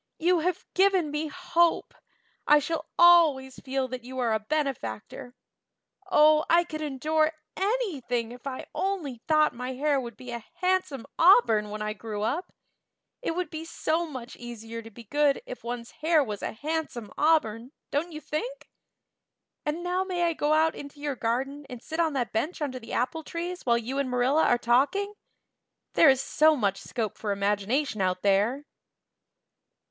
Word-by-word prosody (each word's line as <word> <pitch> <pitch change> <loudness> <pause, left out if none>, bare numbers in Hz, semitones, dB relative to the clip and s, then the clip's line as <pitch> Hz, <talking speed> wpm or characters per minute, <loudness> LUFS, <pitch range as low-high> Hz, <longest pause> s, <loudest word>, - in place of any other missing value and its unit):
"You 350 +1 +3
have 360 +2 -1
given 375 -5 +3
me 300 +1 -2
a - - -10
hope. 345 -2 +1 0.5
I 295 - +7
shall 310 +3 -2
always 315 -7 +5
feel 265 -1 -2
that 250 -1 -6
you 260 +1 -8
are 240 -3 +1
a 220 - +1
benefactor. 245 - -4 0.8
Oh, 305 -2 +6
I 340 +1 +5
could 310 -3 -6
endure 310 +2 +1 0.2
anything 295 - -1
if 250 +2 -9
I 260 -1 -5
only 330 -12 -2
thought 305 -1 +4
my 250 +2 -5
hair 285 +2 +1
would 235 -3 -8
be 250 -1 -9
a 235 -2 -5
handsome 365 -9 0
auburn 235 - +5
when 210 0 -4
I 215 0 -2
grew 210 -1 -5
up. 300 - -2 0.7
It 330 - -2
would 360 0 -3
be 315 -1 -5
so 330 0 -1
much 255 -5 -8
easier 230 -1 -7
to 225 - -11
be 230 +2 -13
good 290 +4 +2
if - - -8
one's 235 0 -5
hair 315 -1 +2
was 210 -5 -5
a - - -3
handsome 290 -4 -4
auburn, 265 -7 +1 0.2
don't 320 +5 -1
you 305 -1 -7
think? 485 +14 -5 1.0
And 320 +4 -2
now 360 +1 0
may 360 -2 -2
I 340 -1 +2
go 300 -1 +1
out 315 +1 +3
into 285 0 -10
your 290 -1 -2
garden 270 +5 -2
and 250 - -7
sit 320 +7 -6
on 325 -3 +2
that 250 -4 -2
bench 295 +11 -1
under 270 -4 -3
the 225 -1 -11
apple 250 +7 -1
trees 345 0 -5
while 235 -1 +4
you 250 +4 -3
and 275 -2 -1
Marilla 250 +5 +2
are 245 - +4
talking? 280 - +1 0.8
There 320 - +7
is 265 -1 +4
so 310 +3 +4
much 200 -7 0
more - - -12
scope 220 -5 -3
for 210 - -2
imagination 205 +5 0
out 185 -1 0
there." 210 +8 +2
280 Hz, 175 wpm, -27 LUFS, 235-320 Hz, 1.0 s, I